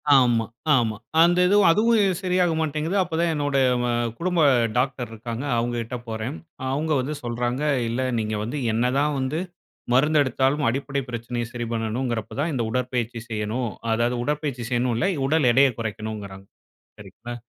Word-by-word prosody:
ஆமா 120 Hz, -4 st, +4 dB, 0.3 s
ஆமா. 115 Hz, -4 st, +1 dB, 0.2 s
அந்த 175 Hz, +1 st, +5 dB
இதுவும். 205 Hz, 0 st, +5 dB
அதுவும் 210 Hz, -1 st, +3 dB
சரியா 180 Hz, 0 st, +2 dB, 0.2 s
மாட்டேங்குது. 155 Hz, +3 st, -1 dB
அப்போ 170 Hz, -2 st, -5 dB
தான் 170 Hz, -, +2 dB
என்னோட 145 Hz, -2 st, 0 dB, 0.3 s
ம -, -, 0 dB, 0.3 s
குடும்ப 180 Hz, -1 st, 0 dB, 0.4 s
டாக்டர் 125 Hz, -1 st, -1 dB
இருக்காங்க, 115 Hz, +2 st, -6 dB
அவுங்ககிட்ட 120 Hz, +1 st, -2 dB
போறேன். 110 Hz, +6 st, -4 dB, 0.3 s
அ -, -, -5 dB
அவுங்க 155 Hz, +3 st, -1 dB
வந்து 140 Hz, +4 st, -3 dB
சொல்றாங்க. 120 Hz, +2 st, -2 dB, 0.3 s
இல்ல 120 Hz, +3 st, -1 dB, 0.2 s
நீங்க 110 Hz, -1 st, -2 dB
வந்து 120 Hz, +7 st, -4 dB, 0.2 s
என்னதான் 135 Hz, +6 st, +1 dB
வந்து 130 Hz, +5 st, -1 dB, 0.5 s
மருந்து 150 Hz, +4 st, +4 dB
எடுத்தாலும் 135 Hz, +2 st, +1 dB
அடிப்படை 135 Hz, +2 st, -2 dB
பிரச்சனையை 120 Hz, 0 st, -3 dB
சரி 120 Hz, -1 st, -4 dB
பண்ணணுங்கிறப்போ 115 Hz, 0 st, -2 dB
தான், 155 Hz, +4 st, +1 dB
இந்த 130 Hz, -, -1 dB
உடற்பயிற்சி 125 Hz, -1 st, -2 dB
செய்யணும், 110 Hz, +2 st, -2 dB, 0.2 s
அதாவது 120 Hz, +2 st, +1 dB
உடற்பயிற்சி 145 Hz, -3 st, -2 dB
செய்யணுன்னு 120 Hz, -1 st, +1 dB
இல்ல. 120 Hz, -, 0 dB, 0.2 s
உடல் 140 Hz, -3 st, +3 dB
எடைய 135 Hz, +2 st, +6 dB
குறைக்கணுங்கிறாங்க. 105 Hz, -3 st, -5 dB, 0.5 s
சரிங்களா 120 Hz, 0 st, -9 dB
125 Hz, 150 wpm, -24 LUFS, 115-150 Hz, 0.5 s, எடைய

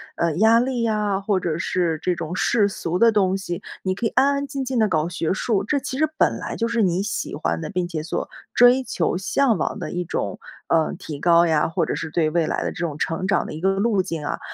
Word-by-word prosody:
呃， 165 Hz, -2 st, 0 dB
压 220 Hz, +3 st, +5 dB
力 245 Hz, -1 st, -1 dB
呀， 210 Hz, -3 st, 0 dB
或 195 Hz, -1 st, 0 dB
者 170 Hz, -4 st, -2 dB
是 170 Hz, -2 st, -1 dB
这 180 Hz, -, +1 dB
种 170 Hz, +1 st, -5 dB
世 210 Hz, +1 st, +2 dB
俗 180 Hz, -3 st, -3 dB
的 230 Hz, +1 st, +6 dB
东 190 Hz, -3 st, +2 dB
西。 175 Hz, -3 st, -5 dB, 0.2 s
你 185 Hz, 0 st, 0 dB
可 230 Hz, -, -3 dB
以 -, -, +2 dB
安 265 Hz, +5 st, +3 dB
安 280 Hz, 0 st, -2 dB
静 275 Hz, 0 st, -4 dB
静 260 Hz, -1 st, -2 dB
地 220 Hz, -, +4 dB
搞 160 Hz, -3 st, 0 dB
学 170 Hz, -1 st, -1 dB
术， 205 Hz, -1 st, 0 dB
这 285 Hz, +6 st, +1 dB
其 260 Hz, -1 st, -5 dB
实 310 Hz, +2 st, +3 dB
本 -, -, +2 dB
来 -, -, -5 dB
就 230 Hz, -, -1 dB
是 230 Hz, 0 st, 0 dB
你 180 Hz, -1 st, +1 dB
喜 205 Hz, 0 st, -3 dB
欢 80 Hz, 0 st, -1 dB
的， -, -, -5 dB
并 180 Hz, -2 st, -2 dB
且 165 Hz, -3 st, -4 dB
所 160 Hz, -, -4 dB, 0.2 s
追 245 Hz, +2 st, +6 dB
求 175 Hz, -7 st, -1 dB
向 225 Hz, +5 st, +1 dB
往 -, -, -2 dB
的 -, -, -5 dB
一 175 Hz, 0 st, -3 dB
种， -, -, -3 dB, 0.3 s
呃， 160 Hz, -1 st, +2 dB
提 150 Hz, -3 st, -7 dB
高 170 Hz, +1 st, +5 dB
呀， 155 Hz, -3 st, +2 dB
或 165 Hz, 0 st, 0 dB
者 -, -, -2 dB
是 165 Hz, -, -4 dB
对 160 Hz, 0 st, +1 dB
未 165 Hz, 0 st, +1 dB
来 -, -, -1 dB
的 -, -, -2 dB
这 -, -, -11 dB
种 150 Hz, -3 st, -4 dB
成 165 Hz, +4 st, -2 dB
长 200 Hz, -, +1 dB
的 -, -, -7 dB
一 155 Hz, -, -6 dB
个 190 Hz, +1 st, +3 dB
路 200 Hz, 0 st, +1 dB
径 165 Hz, -5 st, -5 dB
啊。 -, -, -3 dB
185 Hz, 275 characters per minute, -22 LUFS, 165-225 Hz, 0.3 s, 的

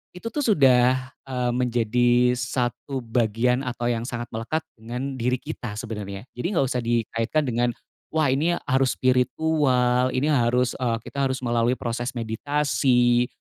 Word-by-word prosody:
Itu 230 Hz, +6 st, -6 dB
tuh 295 Hz, -, -3 dB
sudah, 130 Hz, -, +3 dB, 0.2 s
eee, 125 Hz, -2 st, -1 dB
menjadi 120 Hz, 0 st, +2 dB
1 125 Hz, +2 st, -2 dB
bagian 115 Hz, +1 st, +1 dB
atau 120 Hz, -1 st, -4 dB
yang 115 Hz, 0 st, -2 dB
sangat 120 Hz, -1 st, -5 dB
melekat 120 Hz, +8 st, -2 dB
dengan 125 Hz, +4 st, -6 dB
diri 125 Hz, +2 st, +1 dB
kita 120 Hz, -3 st, -6 dB
sebenarnya. 105 Hz, -3 st, -6 dB
Jadi 125 Hz, -, -7 dB
nggak 140 Hz, -, +3 dB
usah 125 Hz, -, 0 dB
dikaitkan 115 Hz, +4 st, 0 dB
dengan, 120 Hz, -2 st, 0 dB, 0.4 s
wah, 155 Hz, -4 st, +3 dB
ini 160 Hz, +6 st, +1 dB
harus 130 Hz, -2 st, +1 dB
spiritual, 130 Hz, -1 st, +2 dB
ini 145 Hz, +4 st, +1 dB
harus 125 Hz, -2 st, +2 dB
eee, 120 Hz, -3 st, 0 dB
kita 140 Hz, -1 st, -1 dB
harus 130 Hz, 0 st, -4 dB
melalui 120 Hz, +1 st, +1 dB
proses 120 Hz, +1 st, -4 dB
meditasi, 125 Hz, 0 st, +1 dB
125 Hz, 145 wpm, -24 LUFS, 120-130 Hz, 0.4 s, sudah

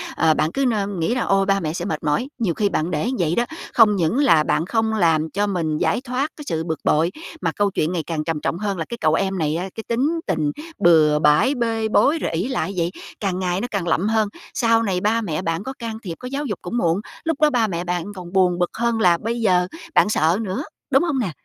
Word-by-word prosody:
ờ, 160 Hz, -1 st, +4 dB
bạn 155 Hz, -, 0 dB
cứ 275 Hz, +6 st, 0 dB
nơ 215 Hz, -5 st, +1 dB
nghĩ 195 Hz, +3 st, -1 dB
là 250 Hz, -, 0 dB
ôi 195 Hz, 0 st, +2 dB
ba 195 Hz, 0 st, +2 dB
mẹ 155 Hz, -2 st, -3 dB
sẽ 175 Hz, +1 st, -4 dB
mệt 200 Hz, -, -3 dB
mỏi. 155 Hz, -, 0 dB
Nhiều 205 Hz, -8 st, +1 dB
khi 205 Hz, +3 st, +1 dB
bạn 165 Hz, 0 st, -1 dB
để 150 Hz, -3 st, -1 dB
như 255 Hz, +3 st, -1 dB
vậy 165 Hz, -1 st, +1 dB
đó, 240 Hz, -, +2 dB, 0.3 s
không 215 Hz, -4 st, +6 dB
những 175 Hz, +5 st, +1 dB
là 165 Hz, -, +5 dB
bạn 160 Hz, -, 0 dB
không 220 Hz, +2 st, 0 dB
làm 165 Hz, -6 st, +2 dB
cho 205 Hz, +6 st, -1 dB
mình 165 Hz, -6 st, -1 dB
giải 240 Hz, -, +1 dB
thoát 265 Hz, +3 st, -2 dB
cái 295 Hz, -, -9 dB
sự 160 Hz, 0 st, -1 dB
bực 160 Hz, -1 st, -3 dB
bội, 165 Hz, +4 st, +2 dB, 0.3 s
mà -, -, 0 dB
câu 205 Hz, -1 st, 0 dB
chuyện 155 Hz, -1 st, 0 dB
ngày 175 Hz, -3 st, -2 dB
càng 155 Hz, -1 st, -3 dB
trầm 160 Hz, -2 st, -3 dB
trọng 170 Hz, -, -1 dB
hơn 200 Hz, -1 st, -2 dB
là 165 Hz, -, -3 dB
cái 235 Hz, -, -5 dB
cậu 155 Hz, -6 st, +2 dB
em 190 Hz, +2 st, 0 dB
này 155 Hz, -2 st, 0 dB
á, 180 Hz, +3 st, -3 dB
cái 225 Hz, -, -6 dB
tính 280 Hz, +8 st, 0 dB
tình 155 Hz, -6 st, 0 dB, 0.3 s
bừa 155 Hz, -3 st, +5 dB
bãi, 150 Hz, -, +4 dB
bê 225 Hz, -2 st, 0 dB
bối 290 Hz, +8 st, +3 dB
rồi -, -, -2 dB
ỷ 175 Hz, +8 st, -1 dB
lại 250 Hz, -7 st, -2 dB
vậy, 170 Hz, 0 st, 0 dB, 0.3 s
càng 190 Hz, -3 st, -1 dB
ngày 180 Hz, 0 st, -1 dB
nó 245 Hz, -, -2 dB
càng 190 Hz, -4 st, -2 dB
lậm 175 Hz, +5 st, +1 dB
hơn. 220 Hz, -1 st, +2 dB, 0.3 s
Sau 230 Hz, -1 st, +2 dB
này 185 Hz, -4 st, -1 dB
ba 225 Hz, +3 st, +2 dB
mẹ 160 Hz, -7 st, -2 dB
bạn 165 Hz, +2 st, -2 dB
có 265 Hz, -, -5 dB
can 230 Hz, -2 st, -5 dB
thiệp, 175 Hz, -5 st, -5 dB
có 250 Hz, -, -7 dB
giáo 280 Hz, +3 st, -3 dB
dục 205 Hz, -7 st, -4 dB
cũng 180 Hz, +7 st, -4 dB
muộn, 175 Hz, -3 st, +1 dB, 0.2 s
lúc 325 Hz, -2 st, -2 dB
đó 305 Hz, -, +6 dB
ba 240 Hz, -5 st, +2 dB
mẹ 175 Hz, -3 st, -3 dB
bạn 180 Hz, +2 st, -3 dB
còn 180 Hz, -1 st, -9 dB
buồn 180 Hz, -2 st, +3 dB
bực 175 Hz, -, 0 dB
hơn 235 Hz, -1 st, 0 dB
là 175 Hz, -4 st, +4 dB
bây 230 Hz, +5 st, -3 dB
giờ 180 Hz, -4 st, +3 dB, 0.3 s
bạn -, -, +5 dB
sợ 165 Hz, -2 st, +2 dB
nữa, 220 Hz, +6 st, -3 dB, 0.3 s
đúng 270 Hz, +3 st, +4 dB
hông 290 Hz, -7 st, 0 dB
nè? 200 Hz, -8 st, -1 dB
195 Hz, 265 wpm, -21 LUFS, 165-230 Hz, 0.3 s, không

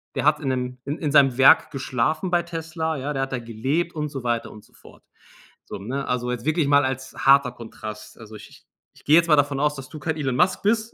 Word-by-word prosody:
Der -, -, -2 dB
hat 150 Hz, 0 st, +4 dB
in 145 Hz, -, -5 dB
'nem 125 Hz, -1 st, -3 dB
in 145 Hz, +3 st, -3 dB
in 150 Hz, -3 st, -2 dB
seinem 135 Hz, -4 st, +4 dB
Werk 135 Hz, -, +6 dB
geschlafen 150 Hz, +6 st, -1 dB
bei 175 Hz, -1 st, +2 dB
Tesla, 165 Hz, -1 st, -4 dB
ja? 140 Hz, +2 st, -4 dB
Der 135 Hz, -1 st, -1 dB
hat 135 Hz, -, -5 dB
da 125 Hz, -, -1 dB
gelebt 130 Hz, +10 st, -2 dB
und 150 Hz, -1 st, -3 dB
so 135 Hz, -3 st, -7 dB
weiter 120 Hz, -1 st, -2 dB
und 105 Hz, -, -13 dB
so -, -, -25 dB
fort. -, -, -18 dB, 0.6 s
So, -, -, -7 dB
ne? 135 Hz, +7 st, -4 dB
Also, 125 Hz, 0 st, -2 dB
jetzt 125 Hz, +1 st, -5 dB
wirklich 155 Hz, -2 st, +1 dB
mal 145 Hz, 0 st, +4 dB
als 130 Hz, 0 st, -4 dB
harter 135 Hz, -2 st, +4 dB
Kontrast. 110 Hz, -2 st, -10 dB
Also, 110 Hz, -1 st, -12 dB
ich -, -, -12 dB
ich -, -, -19 dB, 0.3 s
ich -, -, -20 dB
geh 145 Hz, -, +3 dB
jetzt 170 Hz, 0 st, +5 dB
mal 155 Hz, -, +5 dB
davon 145 Hz, -1 st, +1 dB
aus, 150 Hz, 0 st, +1 dB
dass 135 Hz, -2 st, -9 dB
du 155 Hz, -, -9 dB
kein 160 Hz, +2 st, -2 dB
Elon 135 Hz, -4 st, -2 dB
Musk 185 Hz, +1 st, +2 dB
bist. 220 Hz, +2 st, 0 dB
140 Hz, 255 wpm, -23 LUFS, 125-155 Hz, 0.6 s, Werk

